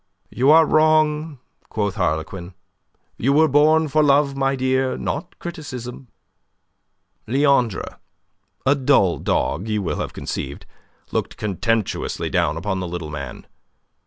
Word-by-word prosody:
"You 130 Hz, +3 st, +2 dB
are 160 Hz, +1 st, +7 dB
wrong," 155 Hz, -1 st, +2 dB, 0.3 s
quoth 100 Hz, -3 st, -1 dB
Harlequin. 90 Hz, 0 st, -3 dB, 0.6 s
"You 135 Hz, +4 st, +2 dB
were 160 Hz, +2 st, +5 dB
born 155 Hz, +2 st, +4 dB
for 155 Hz, +2 st, +2 dB
love, 140 Hz, -1 st, +3 dB
my 135 Hz, 0 st, +1 dB
dear, 130 Hz, 0 st, 0 dB
not 180 Hz, -, -4 dB
criticism." 130 Hz, -7 st, -7 dB, 1.2 s
Leandre 130 Hz, -5 st, +1 dB, 0.7 s
a 140 Hz, -, +5 dB
dull 130 Hz, -10 st, +2 dB
dog, 85 Hz, +8 st, -1 dB
as -, -, -6 dB
you 105 Hz, -2 st, -1 dB
will 85 Hz, -, -2 dB
have -, -, -3 dB
conceived -, -, -5 dB, 0.5 s
looked -, -, -3 dB
contemptuously 105 Hz, +2 st, -2 dB
down 80 Hz, -, +1 dB
upon 95 Hz, +2 st, -2 dB
the 90 Hz, -, -3 dB
little 85 Hz, -3 st, -5 dB
man. 70 Hz, -4 st, -7 dB
130 Hz, 130 wpm, -21 LUFS, 95-150 Hz, 1.2 s, are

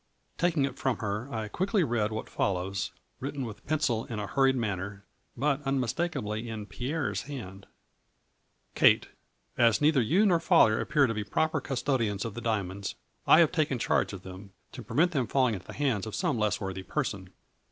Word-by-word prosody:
Taking 170 Hz, -5 st, +2 dB
it 140 Hz, -, -6 dB
from 130 Hz, -3 st, 0 dB
her 105 Hz, +5 st, -3 dB
I 110 Hz, -2 st, -3 dB
quickly 190 Hz, -, +1 dB
read 115 Hz, -6 st, 0 dB
what 110 Hz, -, -4 dB
fol 100 Hz, -, 0 dB
lows, 95 Hz, +1 st, -3 dB, 0.3 s
written 140 Hz, 0 st, -4 dB
with 110 Hz, -3 st, -9 dB
pencil 135 Hz, -7 st, 0 dB
in 115 Hz, -, -6 dB
a 105 Hz, -, -2 dB
hurried 135 Hz, +4 st, +3 dB
manner, 100 Hz, -3 st, -3 dB, 0.3 s
but 145 Hz, 0 st, +1 dB
unmistakably 125 Hz, -4 st, -2 dB
in 110 Hz, -2 st, -5 dB
Pierre's 125 Hz, -, -2 dB
hand: 100 Hz, -8 st, -8 dB, 0.5 s
— -, -, -45 dB
Kate -, -, +4 dB, 0.3 s
— -, -, -41 dB
As 110 Hz, -, 0 dB
neither 150 Hz, -2 st, +4 dB
you 175 Hz, -, +3 dB
nor 175 Hz, -5 st, +4 dB
father 110 Hz, -8 st, +4 dB
appear 150 Hz, -2 st, +3 dB
to 115 Hz, -, -1 dB
be 105 Hz, -1 st, -3 dB
proper 155 Hz, +8 st, 0 dB
custodians 120 Hz, -7 st, -1 dB
of 115 Hz, -, -4 dB
the 120 Hz, -, -6 dB
diamonds, 100 Hz, -4 st, -2 dB, 0.3 s
I 165 Hz, -, +8 dB
have 165 Hz, -, +4 dB
taken 155 Hz, -6 st, +1 dB
charge -, -, +1 dB
of 95 Hz, -3 st, -8 dB
them, 95 Hz, +1 st, -10 dB, 0.2 s
to -, -, -8 dB
prevent 175 Hz, +4 st, +2 dB
them 135 Hz, -8 st, 0 dB
falling 130 Hz, -4 st, +2 dB
into 95 Hz, -3 st, -7 dB
the -, -, -8 dB
hands 120 Hz, -8 st, 0 dB
of 105 Hz, -, -5 dB
some 140 Hz, -, 0 dB
less 105 Hz, -1 st, +1 dB
worthy 95 Hz, -2 st, -4 dB
person. 95 Hz, -4 st, -3 dB
115 Hz, 190 wpm, -29 LUFS, 105-140 Hz, 0.5 s, I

